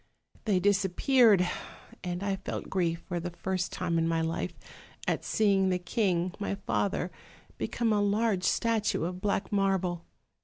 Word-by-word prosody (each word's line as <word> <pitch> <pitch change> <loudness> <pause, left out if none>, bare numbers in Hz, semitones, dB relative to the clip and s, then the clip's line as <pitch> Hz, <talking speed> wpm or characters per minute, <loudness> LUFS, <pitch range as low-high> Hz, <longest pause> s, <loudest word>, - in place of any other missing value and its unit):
"They 200 -5 +3
disappeared! 205 +2 +4 0.6
and 180 +1 -3
I 195 -1 0
felt 190 - -5
grief 170 -3 0
for 175 -2 -2
the 175 +1 -4
first 185 +1 -2
time 170 -2 0
in 165 - +1
my 165 0 +1
life, 160 0 -2 0.5
at - - 0
seeing 195 -3 +3
the 180 - +2
king, 180 -1 0
my 200 -1 -1
father, 195 -2 -1 0.5
become 230 -2 0
a 205 - +2
large 205 -1 +1
statue 225 -5 +1
of 180 +2 -3
black 200 +1 -1
marble. 190 -4 0
190 Hz, 150 wpm, -29 LUFS, 175-205 Hz, 0.6 s, disappeared